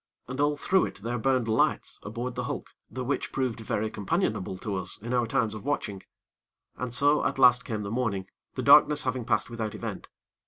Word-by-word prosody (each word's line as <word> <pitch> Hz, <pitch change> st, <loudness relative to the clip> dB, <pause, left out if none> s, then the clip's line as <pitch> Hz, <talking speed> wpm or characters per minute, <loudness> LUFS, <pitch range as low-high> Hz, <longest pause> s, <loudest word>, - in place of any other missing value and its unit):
And 130 Hz, +3 st, -3 dB
all 145 Hz, 0 st, +2 dB
through 190 Hz, +6 st, +2 dB
it -, -, -9 dB
there 120 Hz, +1 st, -2 dB
burned 130 Hz, -1 st, +1 dB
lights 110 Hz, -, +1 dB
aboard 120 Hz, +4 st, -4 dB
the -, -, -3 dB
hulk, -, -, -5 dB, 0.2 s
the 130 Hz, -, -5 dB
which 140 Hz, +3 st, -2 dB
proved 130 Hz, -4 st, -1 dB
very 110 Hz, -1 st, -2 dB
companionable 105 Hz, -, -1 dB
to 100 Hz, 0 st, -3 dB
us 90 Hz, -1 st, -2 dB
in 120 Hz, +4 st, -5 dB
our 120 Hz, -2 st, +2 dB
times 115 Hz, -3 st, +1 dB
of 110 Hz, -, -7 dB
watching; 105 Hz, -9 st, -2 dB, 0.7 s
and 125 Hz, -1 st, -4 dB
so, 145 Hz, +4 st, +3 dB
at -, -, 0 dB
last 125 Hz, -2 st, +6 dB
came 110 Hz, -3 st, -3 dB
the 100 Hz, -, -5 dB
morning, 110 Hz, -6 st, -1 dB, 0.3 s
the -, -, -2 dB
darkness 150 Hz, +1 st, +7 dB
having 130 Hz, -2 st, -2 dB
passed -, -, 0 dB
without 110 Hz, -2 st, -4 dB
event. -, -, -6 dB
120 Hz, 200 wpm, -28 LUFS, 110-135 Hz, 0.7 s, darkness